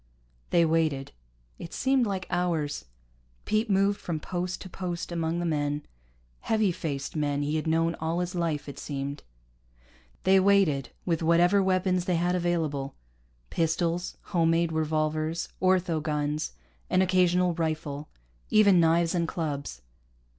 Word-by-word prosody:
They 170 -1 +4
waited. 155 -4 0 0.5
It 165 - -8
seemed 265 -3 +2
like 190 -2 -3
hours. 165 - -1 0.6
Pete 215 +1 +1
moved 200 +1 +2
from 165 -3 -3
post 180 +2 -3
to - - -7
post 180 -2 -5
among 165 0 -1
the 175 - -1
men, 145 -2 -1 0.6
heavy 215 -3 +1
faced 145 -6 -4
men 145 -1 0
he 150 +2 -1
had 155 +1 -1
known 165 +1 +2
all 165 +2 -1
his 180 +1 -2
life, 165 -5 -1
it 140 - -8
seemed. 140 0 -4 1.0
They 190 +1 +5
waited 185 -10 +3 0.2
with 165 -2 0
whatever 175 +4 +4
weapons 185 -1 +1
they 180 - +1
had 175 +2 +1
available 160 -6 -1 0.6
pistols, 165 +2 0
home 170 -4 +1
made 165 0 +2
revolvers, 155 +1 -1
ortho 185 -4 +2
guns, 150 0 -2 0.4
an 185 - +4
occasional 180 -1 +3
rifle, 155 -3 -3 0.4
even 205 -4 +6
knives 165 0 +3
and 170 -2 0
clubs. 145 - -4
170 Hz, 140 wpm, -27 LUFS, 155-180 Hz, 1.0 s, even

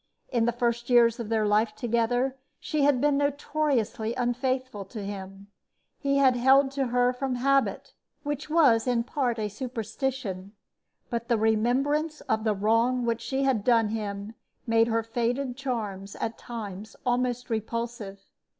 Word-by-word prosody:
In 235 -2 +1
the 240 - +2
first 235 0 -1
years 235 -1 +5
of 230 -3 -5
their 220 -1 +1
life 215 +1 +2
together 245 +3 0 0.2
she 305 - -2
had 280 -2 +4
been 290 +1 +2
notoriously 285 -6 0
unfaithful 255 -2 -1
to 210 +1 -7
him. 195 0 -7 0.5
He 275 0 +1
had 265 -2 +5
held 265 +2 +5
to 275 -1 -1
her 245 +1 +2
from 255 0 -2
habit 275 +2 +1 0.3
which 290 0 -4
was 275 -8 +4
in 240 -2 +2
part 245 -2 -1
a 215 -1 -1
superstition; 225 -3 -4 0.6
but 235 0 -2
the 235 -2 +2
remembrance 265 +8 +1
of 220 - -1
the 215 -1 +2
wrong 230 +5 +2
which 230 -1 -1
she 270 0 -1
had 260 -6 +1
done 230 -3 +3
him 205 -1 -4 0.3
made 230 -1 +3
her 230 0 +1
faded 245 +3 -1
charms 215 -7 -4
at 225 - -3
times 210 -3 -7
almost 245 -1 0
repulsive. 225 -2 -4
240 Hz, 150 wpm, -27 LUFS, 220-265 Hz, 0.6 s, years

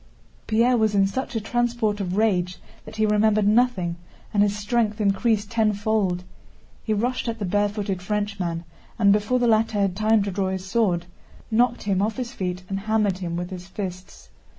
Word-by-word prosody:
Pierre 235 +3 +3
was 220 -2 +2
in 195 -1 +5
such 245 +4 -3
a - - +1
transport 235 -2 0
of 185 -1 -2
rage 185 -5 +1 0.3
that 220 - -10
he 220 0 +2
remembered 210 0 +3
nothing 210 -7 +2 0.4
and 205 - +3
his 205 0 +2
strength 215 0 0
increased 205 +1 +1
tenfold. 210 -4 +1 0.6
He 220 - -3
rushed 245 +4 0
at 230 0 -2
the 210 - -3
barefooted 205 0 -1
Frenchman 180 -4 -2 0.3
and, 200 -3 +5
before 210 +4 +1
the 245 - +1
latter 220 -1 +2
had 195 -2 +1
time 215 +1 +3
to 200 - -3
draw 190 0 -1
his 190 0 -4
sword, 190 -5 +1 0.5
knocked 240 +2 +2
him 195 -2 +1
off 215 +1 -1
his 245 -2 -4
feet 180 -5 -4
and 195 +1 -3
hammered 210 -2 0
him 170 -2 -3
with 175 +2 -4
his 180 -1 -7
fists. 185 -2 -7
210 Hz, 180 wpm, -24 LUFS, 190-220 Hz, 0.6 s, in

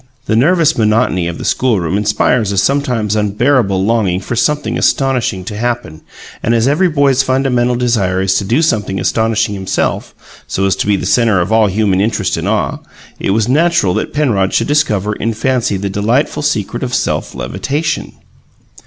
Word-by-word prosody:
The 110 - 0
nervous 160 +3 +3
monotony 105 -5 +1
of 85 - -5
the - - -7
schoolroom 100 -9 0
inspires 105 +1 +1
a 100 - -3
sometimes 120 -3 0
unbearable 105 -2 +1
longing 105 -5 +1
for 100 - -5
something 150 +5 0
astonishing 125 -9 0
to 105 - -6
happen, 115 -8 -3 0.4
and 115 - +1
as 115 +2 +2
every 160 +6 +2
boy's 140 -4 +2
fundamental 130 -2 +1
desire 115 -7 0
is 95 0 +1
to - - -4
do 120 +11 +1
something 105 - 0
astonishing 110 -2 0
himself, 95 -2 -2 0.3
so 95 - -1
as 95 - +1
to - - -2
be 105 - +3
the - - -4
centre 115 -6 +2
of 90 +4 -1
all 110 -1 +4
human 100 -1 +1
interest 110 +1 0
and - - -3
awe, - - -1 0.4
it - - -2
was 105 +2 +1
natural 155 - +2
that - - -2
Penrod 110 -11 0
should - - +2
discover 105 -9 0
in 115 +2 -3
fancy 125 -3 0
the 100 +1 -3
delightful 115 +10 0
secret 120 -4 -2
of 125 -1 -2
self - - -2
levitation. 135 - -3
110 Hz, 175 wpm, -14 LUFS, 100-130 Hz, 0.4 s, all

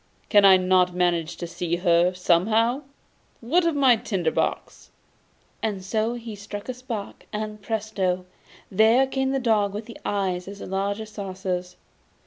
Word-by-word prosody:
Can 205 -2 +6
I 190 -1 +8
not 185 -1 +2
manage 175 -2 0
to - - -5
see 170 0 -2
her 175 0 +3
somehow? 220 - +2 0.6
Where 335 +9 +2
is 330 - +1
my 265 -4 +5
tinder 185 -7 -1
box?' - - -3 0.7
and 200 -4 -3
so 220 +4 0
he 230 -2 -7
struck 205 0 -8
a 255 - -3
spark, 240 -5 -7
and, 210 0 -5
presto! 200 -4 -2 0.5
there 220 +6 +5
came 265 0 -1
the 270 - 0
dog 210 -5 +1
with 220 +2 -6
eyes 185 -3 -1
as 200 0 -8
large 200 +3 -2
as 215 0 -9
saucers. 185 -3 -4
205 Hz, 150 wpm, -24 LUFS, 185-225 Hz, 0.7 s, I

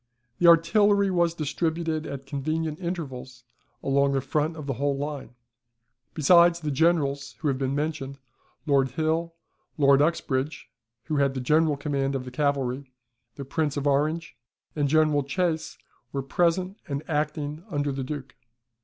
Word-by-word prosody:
The 175 - +4
artillery 200 +4 +5
was 170 -2 +2
distributed 160 +1 -2
at 135 -1 -6
convenient 155 +3 -2
intervals 135 -8 -6 0.4
along 140 0 +2
the 135 - +1
front 155 +4 -1
of 150 - -7
the 140 - -1
whole 140 +2 -1
line. 145 -3 -5 0.8
Besides 170 +2 +5
the 155 -3 -3
Generals 145 -2 +1
who 150 - -2
have 135 -1 -1
been 135 0 -1
mentioned, 145 -2 -3 0.5
Lord 140 -3 +3
Hill, 165 +2 -1 0.4
Lord 140 -1 +5
Uxbridge 150 -2 -1 0.3
(who 155 -2 -2
had 140 -1 +2
the - - -2
general 150 +3 +2
command 140 -1 -1
of 130 -1 -3
the 125 - -7
cavalry), 135 -1 -1 0.4
the 140 - -7
Prince 150 +1 -1
of 145 - -2
Orange, 150 +2 0 0.4
and 145 -2 +1
General 155 -1 +3
Chasse, 160 +3 -2 0.3
were 135 -1 -3
present, 180 +7 0
and 140 -1 -4
acting 150 0 -2
under 145 -4 -1
the 135 0 -3
Duke. 135 -1 -6
150 Hz, 150 wpm, -26 LUFS, 140-165 Hz, 0.8 s, artillery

